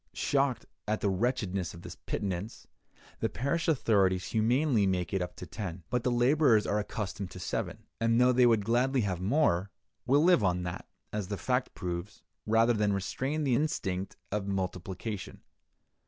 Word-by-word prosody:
Shocked 135 -3 0 0.2
at 110 +1 0
the 100 - +2
wretchedness 95 -5 -1
of 85 - -12
this - - -7
pittance, 100 +2 -4 0.5
the - - 0
parish 140 +7 -1
authorities 100 - +2
humanely 115 0 +2
make 90 -1 -1
it 95 - +1
up 90 - -4
to - - -8
ten. 95 -5 -6
But 125 - +1
the 125 - +2
laborers 120 -2 +4
are 105 - +1
accustomed 100 -2 -4
to - - -9
seven, - - -3 0.2
and 115 +1 +3
though 125 +1 +6
they 125 0 +5
would 110 -4 +3
gladly 125 +3 +2
have 95 -4 -2
more, 100 - +2 0.4
will 140 +4 +4
live 175 -9 +5
on 90 -1 +1
that 90 0 -5 0.3
(as 105 -3 -2
the 100 0 -3
fact 125 +3 -1
proves) 90 +2 -5 0.2
rather 115 +2 +4
than 105 -2 +1
restrain 130 +10 -2
the 135 -3 +2
instinct 100 -9 -1 0.2
of 100 -1 -2
multiplication. 95 +2 -4
105 Hz, 170 wpm, -30 LUFS, 95-125 Hz, 0.5 s, though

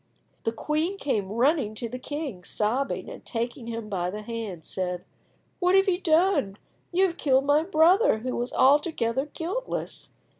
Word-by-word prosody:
The 225 - +2
queen 310 - -1
came 215 - -1
running 240 -1 +2
to 235 - -4
the 250 +2 -6
king, 280 - -5
sobbing, 230 +9 -1
and, - - -9
taking 235 0 -4
him 230 -2 -5
by 180 -4 -2
the 210 +3 -6
hand, 210 -7 -6
said— 180 -1 -3 0.5
"What 360 0 +3
have 385 +1 +5
you 365 -1 +1
done? 320 - +2 0.3
You 370 +2 +4
have 350 -2 -2
killed 270 -1 +3
my 290 +2 +4
brother, 355 - +4
who 250 +3 -4
was 245 +1 -2
altogether 270 -2 +2
guiltless. 365 +12 -4
260 Hz, 160 wpm, -26 LUFS, 220-325 Hz, 0.5 s, have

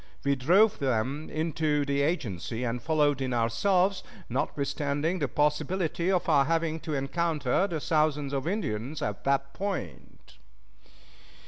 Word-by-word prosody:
We 140 0 +2
drove 190 - +4
them 135 +3 -1
into 155 -2 0
the 140 0 0
agency, 120 - -2
and 120 0 -2
followed 150 -3 +2
in 130 -2 -1
ourselves, 185 - +2 0.3
notwithstanding 145 +5 -1
the 145 - 0
possibility 155 +6 0
of 180 -2 +1
our 145 -4 +4
having 165 +1 0
to 155 -1 -4
encounter 150 +3 0
the 165 -5 -3
thousands 150 -2 +1
of 135 +2 -2
Indians 150 - -2
at 105 -2 -4
that 140 0 +1
point. 195 - -6
150 Hz, 130 wpm, -28 LUFS, 135-165 Hz, 0.3 s, drove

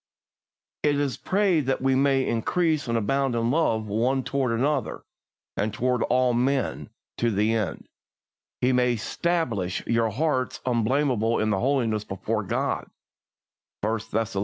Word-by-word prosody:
It 145 -1 +2
is 140 -3 0
prayed 185 -8 +1
that 135 - +1
we 135 0 +2
may 135 0 +2
"increase 155 +6 0
and 115 0 +1
abound 135 +3 0
in 115 +1 +1
love 120 -8 +1
one 120 +6 0
toward 135 -3 -1
another, 130 +2 -1 0.5
and 105 +2 -1
toward 125 +3 0
all 125 0 +2
men... 130 +2 0 0.3
to 120 - +1
the 105 +1 +1
end 105 -7 -2 0.7
He 125 +1 +3
may 125 -1 +3
stablish 115 - -1
your 115 -1 +1
hearts 130 +2 -1
unblameable 120 -1 +1
in 110 0 +1
holiness 115 0 +1
before 105 +2 -3
God" 100 - -2 0.9
(1 110 +2 0
Thess. 110 0 -3
125 Hz, 135 wpm, -25 LUFS, 110-135 Hz, 0.9 s, He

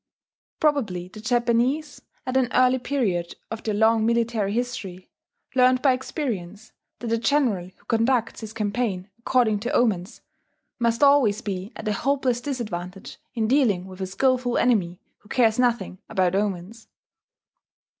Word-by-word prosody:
Probably 215 - 0
the 215 - -11
Japanese, 245 +5 0 0.2
at 255 0 -3
an 260 -2 +3
early 255 0 +4
period 205 -11 -1 0.2
of 225 0 -5
their 215 -2 -2
long 220 +1 +4
military 230 -3 +1
history, 215 -6 -4 0.4
learned 255 0 +4
by 270 -3 +5
experience 225 - -5 0.3
that - - -8
the 230 0 +1
general 235 -7 +1
who - - -28
conducts 230 0 +1
his 220 -1 -7
campaign 205 -3 -2
according 235 -3 +2
to 240 +4 -3
omens 210 -3 0 0.6
must 235 +2 +1
always 260 -7 +4
be 195 +1 -4
at - - -7
a 210 - +1
hopeless 260 +1 0
disadvantage 200 -9 -5 0.2
in 220 -2 0
dealing 225 -9 +2
with 190 0 -10
a 190 - -2
skilful 250 +4 +1
enemy 190 -8 +1 0.2
who 210 - -22
cares 230 -2 +3
nothing 235 -7 0
about 185 -4 +1
omens. 200 +2 -3
230 Hz, 145 wpm, -24 LUFS, 200-250 Hz, 0.6 s, by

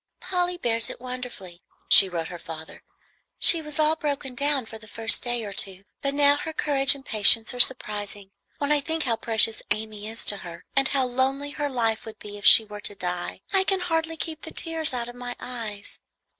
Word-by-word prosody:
"Polly 360 -1 -2
bears 230 -7 -1
it - - -9
wonderfully," 245 -8 -10 0.3
she 195 - +6
wrote 165 -2 -5
her 175 - -10
father; 160 -1 -11 0.6
"she 335 - +8
was 300 -1 -3
all 310 0 +3
broken 285 -4 -5
down 280 -1 0
for 220 0 -11
the 215 - -14
first 225 0 +2
day 240 -1 -4
or 200 - -8
two, 195 -1 -5 0.2
but 275 0 -3
now 285 0 +3
her 320 +2 -7
courage 285 -2 +4
and 270 -1 -14
patience 220 +1 +3
are 245 - -9
surprising. 205 -5 +1 0.3
When 285 0 -3
I 295 -1 +1
think 320 +2 -3
how 235 -4 -1
precious 225 0 +3
Amy 215 -1 -5
is 225 +1 -3
to 205 - +5
her 170 -3 -12
and 275 -1 +2
how 270 -2 -1
lonely 265 +3 -2
her 290 0 -4
life 225 -4 -2
would 220 - -11
be 205 0 -11
if - - +2
she 225 -3 +8
were 210 0 -11
to 205 - -2
die, 180 0 -6
I 385 -1 +3
can 385 0 -2
hardly 325 -2 -3
keep 320 0 -6
the - - -9
tears 325 -2 +1
out 240 -2 -4
of 245 - -10
my 245 0 -8
eyes. 225 -5 -8
245 Hz, 210 wpm, -23 LUFS, 210-290 Hz, 0.6 s, she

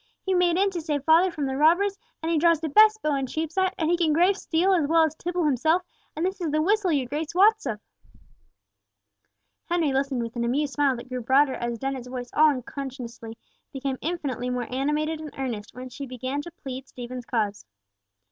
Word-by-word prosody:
He 380 - +1
made 355 -1 +3
in 395 +1 +2
to 350 -3 -4
save 295 -3 -2
father 330 +5 +5
from 305 -5 -3
the 265 0 -2
robbers, 350 +8 +3 0.3
and 325 - -1
he 325 - +2
draws 335 0 +4
the 320 0 -3
best 430 +6 +5
bow 305 - +1
in 270 -1 -1
Cheapside, 325 +7 -1
and 320 0 0
he - - +4
can 335 -3 +1
grave 355 +5 +4
steel 370 +1 +1
as 325 -6 +2
well 325 +1 +4
as 315 -2 +1
Tibble 350 +2 -3
himself, 315 +6 +2 0.3
and 320 +3 -1
this 380 +1 -3
is 335 - -1
the 305 +1 +1
whistle 390 +3 +2
your 280 -4 +1
Grace 300 +6 -4
wots 425 -2 +4
of." 215 -4 -3 1.9
Henry 335 -5 0
listened 270 -2 0
with 230 +1 -7
an 235 - -1
amused 275 +4 0
smile 285 -3 +2
that 240 +2 -9
grew 255 -1 -4
broader 265 +3 +3
as 240 -1 -3
Dennet's 265 -1 -4
voice 250 -1 -6
all 310 0 +6
unconsciously 250 -4 -6 0.3
became 270 -1 -3
infinitely 285 -7 -3
more 250 -1 -2
animated 300 +4 -1
and 305 -2 -9
earnest, 235 -6 -5
when 255 +1 -7
she 275 +2 -7
began 255 +3 -4
to 345 - -9
plead 265 -5 -8
Stephen's 245 0 -8
cause. 210 -4 -1
295 Hz, 205 wpm, -25 LUFS, 255-335 Hz, 1.9 s, all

